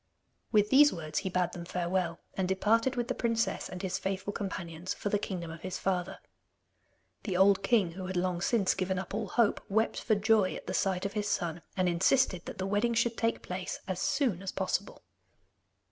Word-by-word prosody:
With 210 -1 +3
these 290 +2 +7
words 155 -3 -3
he 190 - -3
bade 180 -1 0
them 175 - -7
farewell, 175 -1 -1 0.2
and 190 -1 -1
departed 225 +7 +2
with 240 -1 -1
the 255 - 0
princess 230 -1 -1
and 180 +1 -7
his 185 -1 -1
faithful 195 +1 -3
companions 180 -3 -4
for 205 - -3
the 205 - +1
kingdom 175 -5 -4
of 165 0 -9
his 185 0 -4
father. 185 -1 -1 1.0
The 190 -5 -2
old 195 +1 +5
king, 195 -4 +2
who 185 +2 -6
had 185 -1 -3
long 175 -1 0
since 205 -1 +2
given 190 0 -1
up 185 0 -5
all 210 0 -2
hope, 225 +2 +2
wept 220 +3 +1
for 220 - +2
joy 210 -2 +3
at - - -8
the - - -4
sight 190 -1 0
of 200 - -2
his 210 -2 -1
son, 170 -4 -1 0.2
and 185 -1 +2
insisted 180 +2 +2
that - - -6
the 190 - -2
wedding 205 +4 +1
should 230 0 +2
take 230 0 -1
place 180 0 -4
as 185 -2 -2
soon 235 - +1
as 195 - -4
possible. 190 +1 -2
190 Hz, 205 wpm, -30 LUFS, 180-215 Hz, 1.0 s, these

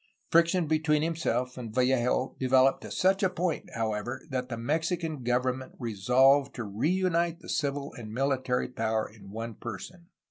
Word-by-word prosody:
Friction 170 +1 +4
between 155 -1 +2
him 165 0 0
self 125 -5 -1
and 115 -3 -6
Vallejo 130 0 +2
developed 130 +1 +4
to - - -8
such 190 +1 +2
a 190 - +3
point, 180 -2 -2
however, 115 +3 -3
that 130 -1 -2
the 120 - -4
Mexican 160 +4 -1
government 125 +2 -1
resolved 130 +5 +3
to 120 - -4
reunite 170 - 0
the - - -12
civil 140 -1 -2
and 110 -3 -8
military 130 0 0
power 110 -2 -1
in 105 -2 -15
one 115 +3 -5
person. 170 - -8
130 Hz, 155 wpm, -29 LUFS, 120-160 Hz, -, Friction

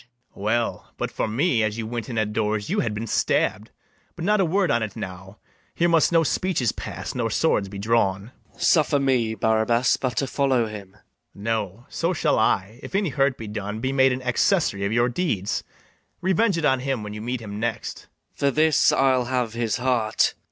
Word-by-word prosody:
[Exit.] - - -27 0.3
BARABAS. 100 - -10
Well, 115 +2 -1
but - - -3
for - - -2
me, 120 +2 +1
as 110 0 -1
you 115 - -3
went 115 0 -5
in 115 - -4
at 105 -1 0
doors 105 -1 -1
You - - +1
had 105 -2 -1
been 110 +2 -3
stabb'd: 105 -1 0 0.5
but 170 - -5
not 210 +1 +3
a - - +3
word 185 0 +1
on't 110 -4 -1
now; 95 +2 -8 0.4
Here 170 - +2
must 165 -2 +3
no 165 -1 +4
speeches 160 - 0
pass, - - -6
nor 120 -2 -1
swords 105 -5 +1
be 100 - -8
drawn. 100 0 0 0.2
MATHIAS. - - 0
Suffer 150 -3 +4
me, 125 -5 +1
Barabas, 110 +2 +2
but 130 -2 -3
to 140 - +2
follow 135 -3 +1
him. 100 -3 -8
BARABAS. - - -25 0.3
No; 105 +1 -3
so 170 +2 -1
shall 150 - +1
I, 110 +1 +1
if - - -8
any 195 -3 +1
hurt 135 -1 +1
be 115 - -7
done, 105 0 -5
Be 130 +3 -1
made 135 -1 +4
an 125 +1 -3
accessary 125 - +1
of 100 - -1
your 120 +1 +3
deeds: 120 - -1 0.6
Revenge 190 +1 +2
it 165 - 0
on 130 -3 +3
him 130 -3 -2
when 105 0 -6
you 105 - -6
meet 125 +2 -3
him 105 -2 -7
next. 115 -1 -4 0.2
MATHIAS. - - -29
For 140 - +3
this 155 +2 +4
I'll 130 -2 +3
have 125 -2 -1
his 115 -2 -1
heart. 120 -4 +1
120 Hz, 210 wpm, -24 LUFS, 110-135 Hz, 0.6 s, no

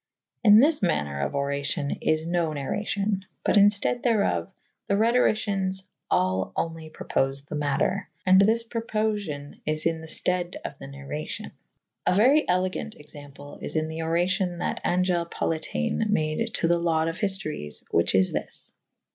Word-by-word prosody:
In 210 -1 +8
this 295 +3 +4
maner 75 - 0
of 70 - -2
oracyon 140 0 -2
is 155 0 +1
no 170 -1 0
narracyon 195 +7 -2
/ - - -48
but - - +3
in 205 -1 +8
ftede 210 +4 +1
therof 200 - +1 0.4
the 200 - +2
Rhetorycyens 215 -4 +2
[C 190 - -4
vii - - -31 0.2
b] - - +1
al 95 +1 +1
only 165 -1 -3
propofe 135 -2 -1
the - - -9
mater. 150 +7 0 0.2
And 190 +1 +7
this 225 +3 +3
propofiow 215 -10 -3
is 155 0 -1
in 165 -1 0
th^ 160 0 +1
itede 180 -1 0
of - - -5
the 135 - -8
narracvo;/. 140 +2 -6 0.6
A - - +4
very 265 +9 +4
elegant 185 +4 -1
example 145 -1 -12
is - - -3
in 155 0 0
the 160 0 -6
oracion 175 +2 0
that 175 - -2
Angele 180 -1 +1
Politiane 160 - -1
made 210 +4 0
to 165 - +1
the 170 0 +3
laude 165 -2 +1
of 165 +2 -4
hiftories 170 - -2
/ - - -32
whiche 85 - +2
is 95 0 +3
this. - - -5
170 Hz, 170 wpm, -26 LUFS, 145-200 Hz, 0.6 s, In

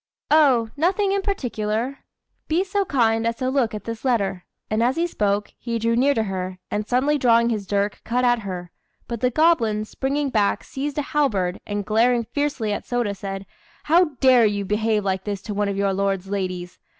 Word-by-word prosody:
"Oh! 260 -8 +4
nothing 380 +6 +1
in 395 0 +1
particular. 245 - -2 0.5
Be 335 +4 +2
so 395 +1 -2
look - - -4 0.3
as 230 - -4
to 255 +2 -2
look 245 -6 +1
at 210 - -6
this 230 -1 -6
letter;" 200 -8 0 0.2
and 215 +1 0
as 245 +3 +2
he 335 - +1
spoke, 205 -9 -1
he 235 -1 -3
drew 230 +1 +1
near 275 +4 +3
to 225 - +1
her, 185 -2 -4
and 210 +1 -2
suddenly 280 +4 +2
drawing 235 -2 +4
his 210 -4 -3
dirk 200 +1 -1
cut 250 +2 0
at 240 -1 +3
her; 180 -4 -6 0.4
but 235 -2 -5
the 250 - +3
goblin, 235 -8 +2
springing 275 +4 -2
back, 210 -4 +1
seized 280 +2 -5
a 295 - 0
halberd, 205 -12 0
and 205 -1 -3
glaring 235 +3 +3
fiercely 260 -4 -2
at - - -4
Sôda, 240 -5 -1
said 195 0 -6 0.4
"How 340 +4 +5 0.2
dare 255 -4 +6
you 205 -1 -2
behave 210 +1 0
like 190 -1 -1
this 200 -2 -4
to 210 - -5
one 205 0 0
of 195 - -3
your 200 -1 +1
lord's 195 -1 -1
ladies? 185 -3 -4
230 Hz, 200 wpm, -23 LUFS, 200-265 Hz, 0.5 s, dare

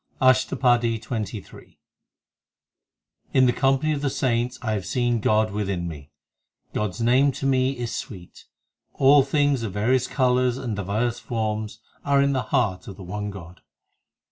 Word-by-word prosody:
ASHTAPADI 125 -2 +3
XXIII 110 -3 -7
i - - -15
In 130 - +6
the 125 - +3
company 135 +3 +1
of 145 - -3
the 145 - 0
saints 125 -2 -1
I 110 - -1
have 105 -3 -2
seen 120 +1 0
God 110 0 +2
within 100 -4 -2
me; 75 -3 -9 0.6
God 105 -1 -1
s 90 +5 -8
name 130 +4 +4
to 135 - -5
me 130 0 +1
is 120 -1 -4
sweet 90 -5 -9 0.5
All 140 +1 +6
things 140 -1 +1
of 110 -5 -4
various 125 +5 +1
colours 125 -2 +1
and 125 -5 -4
divers 110 +5 -1
forms 110 -1 -3 0.2
Are 140 -1 +2
in 140 0 +3
the 130 - 0
heart 120 - 0
of 95 - -9
the 95 - -9
one 105 +3 -5
God. 90 -2 -11
120 Hz, 160 wpm, -24 LUFS, 105-130 Hz, 0.6 s, In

